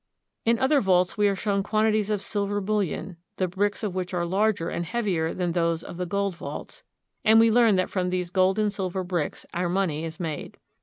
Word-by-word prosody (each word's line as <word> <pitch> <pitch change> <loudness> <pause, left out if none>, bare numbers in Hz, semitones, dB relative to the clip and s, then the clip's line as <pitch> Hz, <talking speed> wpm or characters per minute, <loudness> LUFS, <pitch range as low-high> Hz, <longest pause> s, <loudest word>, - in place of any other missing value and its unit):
In 230 +1 +4
other 265 +3 +3
vaults 180 -2 +2
we 210 -1 +3
are 200 - +1
shown 200 0 0
quantities 215 0 +1
of 210 -2 -1
silver 205 -1 -1
bullion, 195 -3 -2 0.2
the 185 - +1
bricks 205 +4 -1
of 205 -4 -2
which 185 0 -3
are 175 -1 0
larger 195 0 +1
and 170 - -2
heavier 180 -5 -1
than 180 -2 -1
those 165 -1 0
of - - -8
the 180 0 -3
gold 200 0 -1
vaults, - - -7 0.4
and 220 +1 +6
we 225 0 +5
learn 230 -3 +5
that 185 0 0
from 180 -2 0
these 180 -1 -2
gold 190 +1 +3
and 210 -1 +1
silver 190 -1 -2
bricks 175 -4 -3
our 175 0 -1
money 175 -4 0
is 160 -1 -6
made. 160 -4 -5
190 Hz, 210 wpm, -26 LUFS, 175-210 Hz, 0.4 s, and